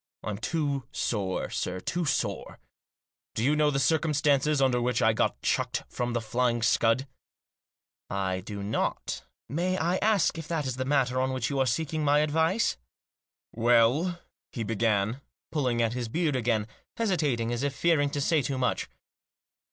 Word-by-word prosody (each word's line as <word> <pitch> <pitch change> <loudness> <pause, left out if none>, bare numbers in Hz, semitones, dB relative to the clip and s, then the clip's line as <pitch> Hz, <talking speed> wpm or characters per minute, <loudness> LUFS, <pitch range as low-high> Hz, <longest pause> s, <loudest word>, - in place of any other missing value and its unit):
I'm 105 -1 -4
too 140 -2 -1
sore, 100 -5 -2
sir, 90 0 -2
too 170 - -2
sore. 105 -8 -2 0.8
Do 110 - -1
you 145 +4 +3
know 150 0 +3
the 140 - 0
circumstances 150 -1 +2
under 130 -2 +2
which 125 0 +1
I 110 -3 +4
got - - 0
chucked - - 0
from 120 -1 -2
The 120 - 0
Flying 120 +1 0
Scud? 115 +2 +3 0.3
" - - - 0.2
" - - -74 0.2
I 95 0 -1
do 100 +1 -6
not. 105 +2 -2 0.2
May 180 +7 -1
I 175 +2 +1
ask 205 -5 +2
if 160 - -7
that 160 -3 -1
is 130 -1 -3
the 130 - -2
matter 130 -2 +1
on 130 0 0
which 130 +2 -2
you 140 - -1
are 130 - +2
seeking 155 +5 -1
my 145 0 +4
advice? 160 +8 +1 0.2
" - - -
" - - -
Well," 120 +9 +3 0.3
he 115 - -3
began, 110 +2 0 0.3
pulling 125 -6 +1
at 115 0 0
his 120 -2 -3
beard 155 +1 0
again, 115 -4 +1 0.3
hesi 215 -5 +1
tating, 120 -7 0
as 120 0 -2
if 140 -1 -1
fearing 155 -3 +2
to 140 0 -3
say 155 +2 +2
too 135 0 -2
much. 125 -1 -1
130 Hz, 180 wpm, -28 LUFS, 115-150 Hz, 0.8 s, I